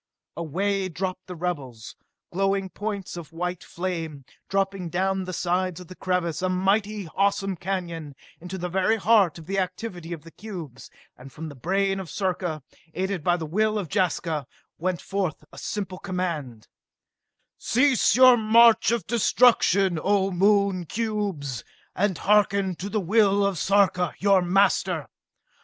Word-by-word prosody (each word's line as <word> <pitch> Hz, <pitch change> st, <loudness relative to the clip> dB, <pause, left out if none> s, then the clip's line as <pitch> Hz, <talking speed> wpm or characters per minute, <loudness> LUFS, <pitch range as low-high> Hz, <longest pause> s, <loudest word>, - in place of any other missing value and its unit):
Away 190 Hz, +5 st, -1 dB
dropped 185 Hz, +1 st, -4 dB
the 180 Hz, -, -7 dB
rebels, 140 Hz, -10 st, -5 dB, 0.4 s
glowing 195 Hz, 0 st, 0 dB
points 205 Hz, -4 st, -5 dB
of 170 Hz, -3 st, -9 dB
white 180 Hz, +1 st, -4 dB
flame, 165 Hz, -6 st, -5 dB, 0.2 s
dropping 195 Hz, -2 st, -1 dB
down 190 Hz, +2 st, 0 dB
the 185 Hz, -, -5 dB
sides 180 Hz, 0 st, -1 dB
of 180 Hz, -, -12 dB
the 185 Hz, -, -9 dB
crevasse, 180 Hz, -3 st, -1 dB
a 185 Hz, -, 0 dB
mighty, 200 Hz, +2 st, 0 dB
awesome 195 Hz, -1 st, +1 dB
canyon, 170 Hz, -5 st, -4 dB, 0.2 s
into 180 Hz, +2 st, -7 dB
the 180 Hz, 0 st, -3 dB
very 190 Hz, +4 st, +2 dB
heart 200 Hz, -6 st, +3 dB
of 165 Hz, -, -11 dB
the 195 Hz, +3 st, -1 dB
activity 180 Hz, -2 st, -4 dB
of 165 Hz, -4 st, -6 dB
the 165 Hz, -, -13 dB
cubes, 175 Hz, -, -9 dB, 0.3 s
and 130 Hz, +2 st, -13 dB
from 160 Hz, +4 st, -7 dB
the 145 Hz, -, -11 dB
brain 195 Hz, +7 st, 0 dB
of 185 Hz, -4 st, -7 dB
Sarka, 180 Hz, -5 st, -2 dB, 0.3 s
aided 190 Hz, -3 st, -2 dB
by 175 Hz, +1 st, +2 dB
the 165 Hz, -, -4 dB
will 215 Hz, +7 st, +1 dB
of 190 Hz, -6 st, -4 dB
Jaska, 160 Hz, -5 st, 0 dB, 0.3 s
went 175 Hz, -2 st, -1 dB
forth 190 Hz, -5 st, -2 dB
a -, -, -9 dB
simple 190 Hz, -3 st, -4 dB
command: 165 Hz, -, -4 dB, 0.9 s
"Cease 255 Hz, -3 st, +3 dB
your 255 Hz, -1 st, +8 dB
march 230 Hz, +1 st, +5 dB
of 235 Hz, -2 st, 0 dB
destruction, 200 Hz, -6 st, +3 dB
O 195 Hz, -1 st, +2 dB
Moon 195 Hz, -1 st, +2 dB
cubes, 200 Hz, -, -3 dB, 0.3 s
and 190 Hz, -2 st, +1 dB
harken 200 Hz, -2 st, +2 dB
to 195 Hz, -, -5 dB
the 215 Hz, -, 0 dB
will 200 Hz, +1 st, +3 dB
of 195 Hz, -5 st, -1 dB
Sarka, 190 Hz, -2 st, +2 dB
your 195 Hz, -1 st, +4 dB
master! 180 Hz, -3 st, +2 dB
185 Hz, 150 wpm, -25 LUFS, 170-200 Hz, 0.9 s, your